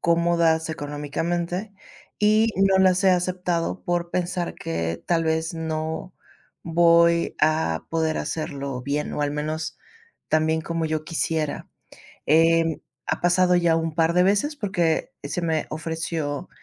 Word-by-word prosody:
cómodas 170 Hz, -1 st, +2 dB
económicamente, 170 Hz, +6 st, -3 dB, 0.5 s
y 215 Hz, +1 st, +3 dB
no 195 Hz, 0 st, +4 dB
las 185 Hz, 0 st, +4 dB
he 190 Hz, -, +6 dB
aceptado 180 Hz, -1 st, -1 dB
por 175 Hz, -2 st, -1 dB
pensar 175 Hz, -1 st, -2 dB
que 80 Hz, 0 st, -3 dB
tal 165 Hz, -2 st, +1 dB
vez 160 Hz, +1 st, -1 dB
no 160 Hz, +2 st, -4 dB, 0.5 s
voy 170 Hz, 0 st, +4 dB
a 155 Hz, -, +1 dB
poder 160 Hz, -1 st, 0 dB
hacerlo 140 Hz, -5 st, -4 dB
bien, 145 Hz, +3 st, -2 dB
o, 150 Hz, -, -1 dB
al 145 Hz, -, 0 dB
menos, 155 Hz, +2 st, -4 dB, 0.5 s
tan 155 Hz, 0 st, +2 dB
bien 160 Hz, 0 st, +1 dB
como 165 Hz, 0 st, -3 dB
yo 155 Hz, 0 st, -2 dB
quisiera. 160 Hz, -2 st, -2 dB, 0.6 s
Em, 165 Hz, +1 st, +3 dB, 0.3 s
ha -, -, -2 dB
pasado 180 Hz, +1 st, +4 dB
ya, 170 Hz, -2 st, +3 dB
un 165 Hz, -1 st, -1 dB
par 165 Hz, 0 st, +2 dB
de 180 Hz, +1 st, +4 dB
veces 205 Hz, +11 st, +1 dB
porque 185 Hz, -, 0 dB
se 145 Hz, +5 st, -3 dB
me 160 Hz, -2 st, 0 dB
ofreció 160 Hz, -1 st, -3 dB
165 Hz, 135 wpm, -24 LUFS, 155-175 Hz, 0.6 s, he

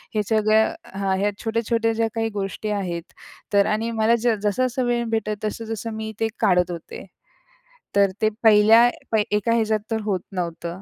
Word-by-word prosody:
हे 210 Hz, -, +2 dB
सगळं 215 Hz, 0 st, +3 dB, 0.2 s
हां. 195 Hz, -1 st, 0 dB
ह्या 205 Hz, +1 st, +1 dB
छोट्या-छोट्या 230 Hz, 0 st, 0 dB
ज्या 225 Hz, 0 st, 0 dB
काही 225 Hz, 0 st, 0 dB
गोष्टी 195 Hz, +2 st, -4 dB
आहेत 170 Hz, -3 st, -5 dB, 0.4 s
तर 200 Hz, 0 st, +5 dB
आणि 225 Hz, +2 st, -2 dB
मला 225 Hz, +2 st, +4 dB
ज 235 Hz, -1 st, +2 dB
जसं-जसं 250 Hz, +4 st, 0 dB
वेळ 240 Hz, -1 st, 0 dB
भेटेल, 215 Hz, -1 st, -1 dB
तसं-तसं 225 Hz, +1 st, -4 dB
मी 220 Hz, 0 st, -4 dB
ते 225 Hz, -, +3 dB
काढत 180 Hz, -1 st, +2 dB
होते. 170 Hz, -2 st, -8 dB, 0.9 s
तर 200 Hz, -1 st, +4 dB
ते 215 Hz, -, +4 dB
पहिल्या 225 Hz, +2 st, +7 dB, 0.4 s
एका 210 Hz, +2 st, +1 dB
ह्याच्यात 220 Hz, -2 st, +1 dB
तर 220 Hz, -, 0 dB
होत 195 Hz, -4 st, -1 dB
नव्हतं. 170 Hz, 0 st, -4 dB
215 Hz, 160 wpm, -23 LUFS, 200-225 Hz, 0.9 s, पहिल्या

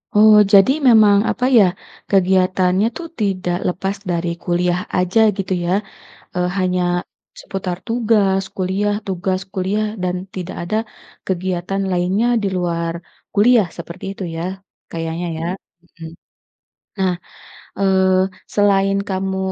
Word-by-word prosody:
Oh. 215 Hz, +1 st, +7 dB, 0.2 s
Jadi 195 Hz, +4 st, +7 dB, 0.2 s
memang 215 Hz, -4 st, +6 dB
apa 250 Hz, -, -1 dB
ya, 215 Hz, -, +8 dB, 0.5 s
kegiatannya 185 Hz, 0 st, +3 dB
tu, -, -, -7 dB, 0.2 s
tidak 185 Hz, -3 st, 0 dB
lepas 190 Hz, +2 st, -3 dB, 0.2 s
dari 170 Hz, 0 st, -1 dB, 0.2 s
kuliah 175 Hz, 0 st, +1 dB, 0.2 s
aja 180 Hz, +4 st, +1 dB, 0.2 s
gitu 195 Hz, -1 st, -2 dB
ya, 175 Hz, -, -1 dB, 0.6 s
eee, 180 Hz, 0 st, +1 dB
hanya 180 Hz, -1 st, +1 dB, 0.6 s
seputar 185 Hz, -2 st, -4 dB
tugas 215 Hz, -5 st, +2 dB
kuliah 195 Hz, +2 st, 0 dB
tugas 185 Hz, 0 st, -1 dB
kuliah 195 Hz, +3 st, -1 dB, 0.2 s
dan 180 Hz, 0 st, 0 dB, 0.2 s
tidak 185 Hz, 0 st, -5 dB
ada 175 Hz, +5 st, -3 dB, 0.5 s
kegiatan 185 Hz, +1 st, -2 dB
lainnya 185 Hz, +6 st, +1 dB
di 205 Hz, -, 0 dB
luar 170 Hz, -1 st, -1 dB, 0.4 s
kuliah 215 Hz, -1 st, +4 dB
seperti 170 Hz, +1 st, -8 dB
itu 195 Hz, -, -6 dB
ya, -, -, -3 dB, 0.5 s
kayaknya 165 Hz, +1 st, -4 dB
ya. 165 Hz, -, -4 dB, 0.4 s
Mhm. 165 Hz, -2 st, -11 dB, 0.9 s
Nah, 190 Hz, -1 st, +2 dB, 0.7 s
eee, 190 Hz, -1 st, +3 dB, 0.4 s
selain 195 Hz, -1 st, +3 dB
kamu 190 Hz, 0 st, -2 dB
190 Hz, 120 wpm, -19 LUFS, 180-200 Hz, 0.9 s, ya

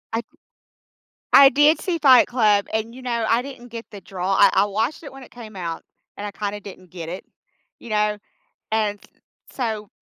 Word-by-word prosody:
I 230 Hz, -, -2 dB, 1.1 s
I 275 Hz, -1 st, +9 dB
did 295 Hz, +3 st, +4 dB
see 360 Hz, -3 st, -1 dB
Fight 265 Hz, -5 st, +6 dB
Club, 210 Hz, -5 st, +2 dB
and, 220 Hz, +1 st, -2 dB
you 260 Hz, -, -11 dB
know, 235 Hz, -3 st, -2 dB
I 230 Hz, +2 st, +2 dB
didn't 255 Hz, -2 st, -10 dB
get 230 Hz, 0 st, -8 dB
the 205 Hz, -, -9 dB
draw. 185 Hz, +1 st, -3 dB
I -, -, +6 dB
I -, -, +4 dB
watched 220 Hz, +10 st, -2 dB
it 285 Hz, -, -9 dB
when 270 Hz, 0 st, -12 dB
it -, -, -16 dB
came 220 Hz, -4 st, -11 dB
out, 170 Hz, -3 st, -5 dB, 0.3 s
and 205 Hz, -, -7 dB
I -, -, -6 dB
kinda 205 Hz, 0 st, -4 dB
didn't 185 Hz, -3 st, -13 dB
get 170 Hz, -3 st, -7 dB
it. 180 Hz, +2 st, -7 dB, 0.5 s
You 235 Hz, -, -12 dB
know? 210 Hz, 0 st, +1 dB, 0.5 s
And, 210 Hz, -2 st, 0 dB
s -, -, -20 dB, 0.5 s
so 220 Hz, -5 st, -3 dB
220 Hz, 195 wpm, -22 LUFS, 200-250 Hz, 1.1 s, I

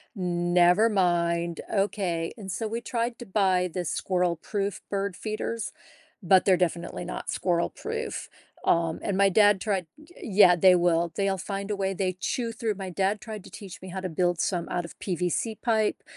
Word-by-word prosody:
never 175 Hz, +3 st, +3 dB
mind. 170 Hz, -3 st, +1 dB
Okay." 190 Hz, -5 st, 0 dB
And 195 Hz, -3 st, -6 dB
so, 220 Hz, +4 st, -2 dB
we 230 Hz, +2 st, -3 dB
tried 235 Hz, 0 st, -2 dB
to 240 Hz, -, -7 dB
buy 185 Hz, -2 st, +2 dB
the 180 Hz, -1 st, -2 dB
squirrel 180 Hz, +1 st, 0 dB
proof 200 Hz, +4 st, -3 dB
bird 200 Hz, -2 st, -2 dB
feeders, 220 Hz, +1 st, -4 dB, 0.5 s
but 185 Hz, +1 st, +5 dB
they're 185 Hz, -2 st, +5 dB
definitely 175 Hz, 0 st, -2 dB
not 180 Hz, -, -6 dB
squirrel 170 Hz, -2 st, 0 dB
proof. 455 Hz, +1 st, -5 dB, 0.4 s
Um, 165 Hz, -1 st, +2 dB
and 195 Hz, -2 st, -1 dB
my 200 Hz, 0 st, +5 dB
dad 205 Hz, 0 st, +5 dB
tried 190 Hz, -5 st, -1 dB, 0.3 s
Yeah, 190 Hz, -4 st, +6 dB
they 185 Hz, +1 st, +6 dB
will. 170 Hz, -1 st, +2 dB
They'll 195 Hz, -1 st, 0 dB
find 200 Hz, +2 st, -4 dB
a -, -, 0 dB
way. 195 Hz, -1 st, -1 dB
They 185 Hz, -1 st, -1 dB
chew 230 Hz, +3 st, -2 dB
through 220 Hz, -3 st, -2 dB
My 190 Hz, -1 st, -6 dB
dad 195 Hz, +3 st, 0 dB
tried 215 Hz, -4 st, -8 dB
to -, -, -11 dB
teach 195 Hz, -4 st, -10 dB
me 185 Hz, -, -8 dB
how 190 Hz, +1 st, -4 dB
to 185 Hz, -, -2 dB
build 175 Hz, +1 st, 0 dB
some 175 Hz, -3 st, -1 dB
out 175 Hz, -1 st, -2 dB
of -, -, -12 dB
PVC 180 Hz, +5 st, -1 dB
pipe 220 Hz, -3 st, +1 dB
190 Hz, 180 wpm, -27 LUFS, 175-210 Hz, 0.5 s, Yeah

